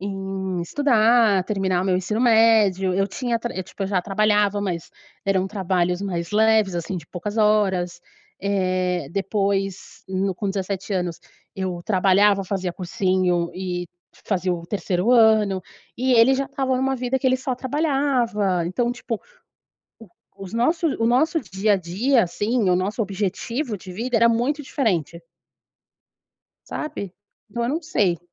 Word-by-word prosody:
em 190 -2 -4
estudar, 225 - +3
terminar 190 -3 0
o - - -2
meu 185 -1 +2
ensino 210 +5 -2
médio, 220 -6 +4
eu 195 +1 +1
tinha 240 +1 -2
tra 240 +1 -5
tipo, 195 +2 -6
eu - - -2
já 190 -3 0
trabalhava, 205 0 +2
mas 175 -4 -4 0.3
eram 190 -1 +1
trabalhos 185 -2 -1
mais 170 -4 -3
leves, 215 -3 +3
assim, 175 +2 -3
de 160 - -12
poucas 205 +4 -6
horas. 190 -5 +2 0.4
Eh, 185 -5 0
depois, 195 -1 -2
hum, 190 0 -1
com 200 +2 -3
17 195 +1 -4
anos, 180 -3 -2 0.3
eu 185 -2 -3
trabalhava, 195 0 +3
fazia 185 -2 -2
cursinho 180 -1 0
e 180 -1 -4 0.4
fazia 185 -2 0
o 170 -1 -5
3º 195 +2 -1
ano. 215 -5 +4 0.3
E 255 +1 +1
ele 240 +3 +6
já 275 +1 0
estava 265 -2 -1
numa 265 +1 0
vida 250 +1 -1
que 260 - -1
ele 255 0 +4
só 260 -1 -3
trabalhava, 255 - 0
então, 240 +7 0
tipo, 235 -3 -4 0.8
o 225 - -13 0.3
os 195 +1 -9
nossos 315 +7 +1
o 225 - +2
nosso 310 +7 +2
dia 205 -1 0
a - - +4
dia, 215 +9 +1
assim, 210 +4 0
o 180 - +4
nosso 200 +5 -2
objetivo 210 +5 -2
de 185 - -11
vida 230 +6 -2
era 235 +1 +5
muito 255 +6 0
diferente. 180 - -1 1.5
Sabe? 200 - -5 0.4
Então, 235 -1 -3
eu 235 - 0
não 315 +5 -1
sei 200 - 0
200 Hz, 155 wpm, -23 LUFS, 185-235 Hz, 1.5 s, ele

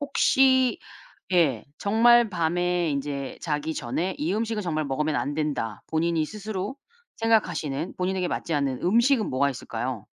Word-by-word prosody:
혹시 260 -3 +3 0.6
예. 145 -11 +3
정말 235 +2 +5
밤에 175 -1 0
인제 140 -1 -4
'자기 155 0 -2
전에 165 +10 -2
이 165 +5 -1
음식은 225 -1 -1
정말 155 -3 -1
먹으면 150 +2 -1
안 145 - -1
된다.' 145 -8 -2
본인이 160 0 0
스스로 210 - -5 0.4
생각하시는 175 -9 0
본인에게 185 0 -1
맞지 165 - -3
않는 140 -3 -1
음식은 235 +5 +3
뭐가 140 +2 +2
있을까요? 120 -3 -5
170 Hz, 310 characters per minute, -25 LUFS, 145-210 Hz, 0.6 s, 정말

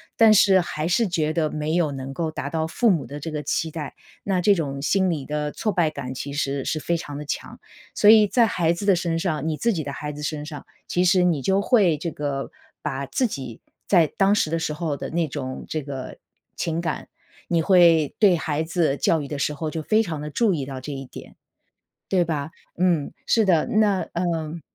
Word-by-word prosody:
但 225 -1 +6
是 195 -1 +6
还 155 -2 -3
是 215 +6 +2
觉 155 -4 0
得 160 -2 +1
没 150 +1 -3
有 170 -4 +1
能 135 0 -6
够 160 +3 -2
达 155 - -5
到 160 -1 -1
父 220 +7 +2
母 165 -6 -1
的 145 +1 -7
这 160 +2 -5
个 150 - -3
期 160 +2 -1
待， 150 -4 -6 0.3
那 195 -2 0
这 200 +3 +4
种 145 -7 -3
心 190 +4 +2
理 150 -6 -2
的 150 0 -2
挫 215 - -2
败 175 -4 +2
感 135 -4 -6
其 140 +2 -6
实 140 -1 -2
是 155 - -2
非 170 +3 -1
常 145 -4 -6
的 150 - -6
强。 145 - -5 0.4
所 205 - +3
以 215 -1 +8
在 235 +3 +4
孩 170 -6 +1
子 170 +4 -3
的 200 -2 +5
身 170 -1 -1
上 165 -3 -2
你 155 - -2
自 235 +5 +1
己 165 -5 -2
的 140 - -5
孩 150 +1 -5
子 150 0 -9
身 150 0 -3
上 150 -2 -8 0.2
其 180 - +1
实 180 0 +4
你 170 -5 +2
就 190 +7 +2
会 200 - +3
这 165 +3 -4
个 140 -2 -4 0.3
把 135 +1 -3
自 255 - 0
己 130 - -6 0.3
在 175 -5 +5
当 195 +7 +2
时 160 -7 0
的 165 - 0
时 155 - -2
候 155 -2 -2
的 - - -6
那 165 0 0
种 130 -2 -6
这 155 - -3
个 135 -2 -7 0.4
情 165 0 -2
感， 170 - -3 0.4
你 170 -1 +2
会 165 -4 +4
对 200 -5 +6
孩 155 -1 -1
子 160 -4 0
教 160 +1 +2
育 140 - -6
的 145 0 -5
时 145 +1 -1
候 155 +2 -4
就 160 0 -4
非 215 +7 +3
常 170 -8 -4
地 150 - -5
注 225 +1 +2
意 140 -4 -3
到 130 -1 -7
这 145 - -6
一 135 -1 -6
点， - - -12 0.7
对 185 -2 +2
吧？ 155 -3 -3 0.3
嗯， 170 -6 +1
是 225 - +3
的。 170 -6 +3
那 210 -3 +2
嗯， 170 -2 -2
160 Hz, 245 characters per minute, -23 LUFS, 145-180 Hz, 0.7 s, 以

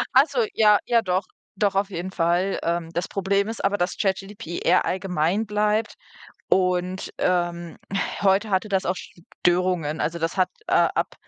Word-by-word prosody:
Ach - - +8
so, 475 - 0
ja, 210 -2 +5
ja 235 -1 +3
doch, 185 -2 0 0.3
doch 200 0 +1
auf 195 +1 0
jeden 185 0 -5
Fall. 175 +2 +1
Ähm, 170 -1 -2
das 175 - -2
Problem 200 +1 0
ist 225 -2 -4
aber, 200 +1 +2
dass 175 +1 -1
ChatGPT 195 -2 -3
eher - - +4
allgemein 185 +2 0
bleibt 210 +1 0 0.5
und, 185 0 0
ähm, 175 -1 -1 0.5
heute 200 +2 +3
hatte 200 +1 0
das 190 -1 0
auch 180 - +1
Störungen. 175 -3 -1
Also 170 +2 -1
das 165 +3 -2
hat, 185 - +3 0.2
äh, - - -3 0.2
ab - - -1
190 Hz, 165 wpm, -24 LUFS, 175-200 Hz, 0.5 s, Ach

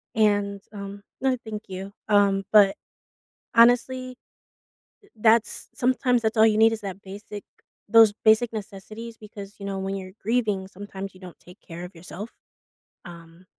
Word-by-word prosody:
And, 205 -2 +1
um 200 0 -8 0.2
Oh, 260 -1 +2
thank 215 -1 -6
you. 190 +1 -7 0.2
Um, 200 -2 +3
but, 205 -2 +6 0.8
honestly, 250 +2 +3 1.0
that's 225 +1 +2
sometimes 250 -1 +2
that's 220 0 -1
all 220 - +7
you 215 -1 +2
need 225 +1 +6
is 225 - -4
that 195 -1 -7
basic 205 +1 -9 0.5
those 225 -1 +7
basic 220 +2 +4
necessities 215 +3 -8
because, 205 -1 -11
you 200 - -7
know, 195 -1 -3
when 195 +1 -3
you're 185 -1 -7
grieving, 215 -4 0
sometimes 195 0 -8
you 185 - -17
don't 180 -2 -11
take 180 +2 -17
care 170 0 -9
of 180 - -9
yourself, 185 +5 -9 0.8
um, 170 0 -13
205 Hz, 150 wpm, -25 LUFS, 195-225 Hz, 1.0 s, all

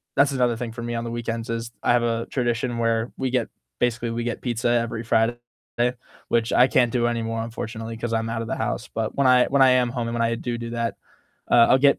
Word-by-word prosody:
That's 140 +1 +4
another 125 -3 +1
thing 115 -1 -4
for 115 - -7
me 120 0 -3
on 115 - -2
the 115 - -4
weekends 115 -1 -4
is 115 0 -4
I - - +3
have 120 -1 +3
a 115 0 0
tradition 120 -1 -1
where 115 0 0
we 130 - -2
get 125 -2 0 0.3
basically 120 -1 0
we 115 +1 -2
get 120 - -3
pizza 120 -1 -1
every 115 -1 0
Friday, 115 +1 +2 0.9
which 115 -1 +1
I 125 - +6
can't 125 -3 +3
do 120 -1 +1
anymore 115 -1 -2
unfortunately, 115 0 -6
'cause 115 0 -3
I'm 115 0 0
out 115 0 -2
of 115 - -5
the - - -1
house, - - -3
but 110 -1 -2
when 140 -2 +3
I 125 -1 +6
when 140 0 +2
I 130 - +8
am 125 -1 +3
home 120 -2 -3
and - - -4
when 115 - 0
I 115 0 +1
do 120 0 -3
do 115 0 -6
that, 115 -1 -2 0.6
uh, 115 -1 +7
I'll 130 - +6
get 140 +1 +4
115 Hz, 250 wpm, -24 LUFS, 115-120 Hz, 0.9 s, I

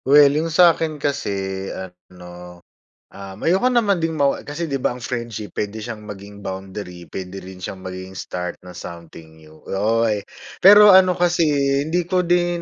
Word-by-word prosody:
Well, 145 +1 +6
yung 160 +3 -1
sa 170 +1 +6
akin 155 -1 -3
kasi 100 -10 -3
ano, 90 -1 -10 0.5
um, 95 -1 -10
ayoko 185 +8 +2
naman 210 -5 +2
ding 165 -1 -1
mawa 140 -3 0
kasi 155 +3 -4
'di 140 - -1
ba 130 - -1
ang 125 - -10
friendship 115 -4 -5
puwede 105 +1 -3
siyang 110 -1 -7
maging 100 0 -10
boundary, 95 -2 -7
puwede 95 +1 -7
rin 95 0 -11
siyang 95 +1 -7
maging 95 0 -8
start 90 -1 -6
ng 90 -1 -12
something 80 -2 -11
new, 80 0 -17 0.2
oy! 110 +1 +1 0.4
Pero 205 +1 +9
ano 185 -1 +5
kasi, 175 -2 +2
eh, 140 -1 +1
hindi 175 +1 0
ko 180 +1 +1
din 175 0 +1
110 Hz, 170 wpm, -21 LUFS, -, 0.5 s, Pero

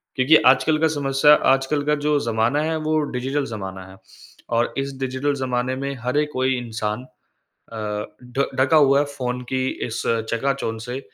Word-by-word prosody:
क्योंकि 130 +4 +5
आजकल 155 +4 +3
का 160 - +4
समस्या 145 -1 +3 0.2
आजकल 135 +2 0
का 150 0 +2
जो 150 -1 +3
ज़माना 115 +4 0
है, 160 +1 -1
वो 155 0 0 0.2
डिजिटल 135 +3 -1
ज़माना 95 -5 -7
है। - - -13 0.5
और 115 0 0
इस 135 0 -2
डिजिटल 130 +2 -1
ज़माने 130 -1 -1
में 140 +1 -3
हर 125 +3 -1
एक 150 0 +1
कोई 130 0 +1
इंसान 110 -1 -4 0.7
अ, 105 -2 -4 0.3
ढ 140 - +3
ढका 140 +4 +4
हुआ 140 -2 +5
है 145 - +1
फ़ोन 125 -1 -3
की 130 0 0 0.2
इस 115 +1 -4 0.3
चकाचौंध 115 -2 -1
से। 125 +3 -5
130 Hz, 175 wpm, -22 LUFS, 120-145 Hz, 0.7 s, क्योंकि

